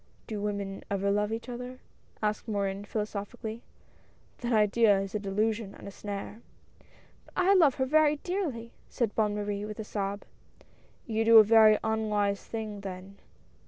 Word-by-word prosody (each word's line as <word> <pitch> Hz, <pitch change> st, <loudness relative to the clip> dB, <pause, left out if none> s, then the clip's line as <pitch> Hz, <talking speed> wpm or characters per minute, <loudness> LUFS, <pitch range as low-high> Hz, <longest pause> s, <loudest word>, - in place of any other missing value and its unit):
"Do 215 Hz, -3 st, -5 dB
women 200 Hz, -1 st, -3 dB
ever 200 Hz, 0 st, 0 dB
love 210 Hz, +1 st, +1 dB
each 225 Hz, +2 st, -4 dB
other?" 250 Hz, +1 st, -6 dB, 0.5 s
asked 210 Hz, +2 st, -1 dB
Morin 200 Hz, -1 st, -2 dB
philosophically, 215 Hz, +2 st, -5 dB, 0.3 s
— -, -, -32 dB
" -, -, -34 dB
that 240 Hz, 0 st, -3 dB
idea 210 Hz, -1 st, +4 dB
is 195 Hz, 0 st, -4 dB
a 210 Hz, -, -1 dB
delusion 210 Hz, +1 st, -1 dB
and -, -, -11 dB
a -, -, -7 dB
snare." 205 Hz, +2 st, -7 dB, 0.4 s
" -, -, -30 dB
But -, -, -21 dB
I 370 Hz, +2 st, +4 dB
love 320 Hz, -8 st, +5 dB
her 260 Hz, -2 st, 0 dB
very 300 Hz, +2 st, +4 dB
dearly," 295 Hz, -9 st, -3 dB, 0.2 s
said 230 Hz, -4 st, -1 dB
Bonne 210 Hz, -2 st, +1 dB
Marie, 205 Hz, -1 st, -3 dB
with 210 Hz, 0 st, -6 dB
a -, -, -3 dB
sob. 200 Hz, -1 st, -3 dB, 0.4 s
" -, -, -33 dB
You 225 Hz, -1 st, 0 dB
do 225 Hz, 0 st, +7 dB
a 220 Hz, -, +11 dB
very 215 Hz, 0 st, +6 dB
unwise 210 Hz, -2 st, 0 dB
thing, 215 Hz, -2 st, -5 dB
then." 190 Hz, 0 st, -8 dB
215 Hz, 175 wpm, -29 LUFS, 200-230 Hz, 0.5 s, a